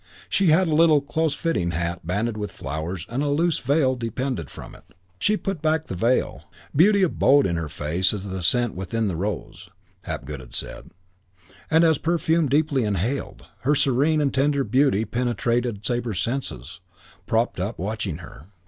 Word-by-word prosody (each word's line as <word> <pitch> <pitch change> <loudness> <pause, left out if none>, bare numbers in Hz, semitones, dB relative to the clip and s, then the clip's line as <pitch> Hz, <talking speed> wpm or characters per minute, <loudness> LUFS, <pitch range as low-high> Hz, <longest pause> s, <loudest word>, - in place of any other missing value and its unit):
She 195 - +2
had 170 +3 +4
a 160 - 0
little 155 -1 +5
closefitting 155 - -1
hat 85 +1 -2
banded 105 +7 -1
with 105 -1 -4
flowers 80 +3 -5
and 125 +4 -2
a 145 - 0
loose 165 +3 +1
veil 135 -1 +2
depended 120 - -3
from - - -10
it. - - -18 0.2
She 210 0 +2
put 195 -7 -4
back 160 0 +1
the - - -6
veil. 115 +8 0 0.3
Beauty 200 +6 +5
abode 145 -5 +4
in 85 - 0
her 80 -2 -3
face 80 +6 0
as 100 -1 -5
the 95 -1 -4
scent 120 +7 +2
within 95 +5 -2
the 90 - -2
rose, 90 -1 -5 0.4
Hapgood 70 +2 -5
had 65 -2 -10
said; - - -5 0.8
and, 160 +1 +5
as 160 -3 +4
perfume 165 -2 +1
deeply 145 -2 +2
inhaled, 105 +6 -2
her 145 +4 +2
serene 145 +4 +2
and 140 -2 +1
tender 140 +1 +2
beauty 125 -2 +2
penetrated 120 -2 -1
Sabre's 120 -5 -1
senses, 115 - -3 0.5
propped 115 -2 0
up, 100 +5 -3
watching 100 -3 -3
her. 70 +3 -14
120 Hz, 165 wpm, -24 LUFS, 95-150 Hz, 0.8 s, little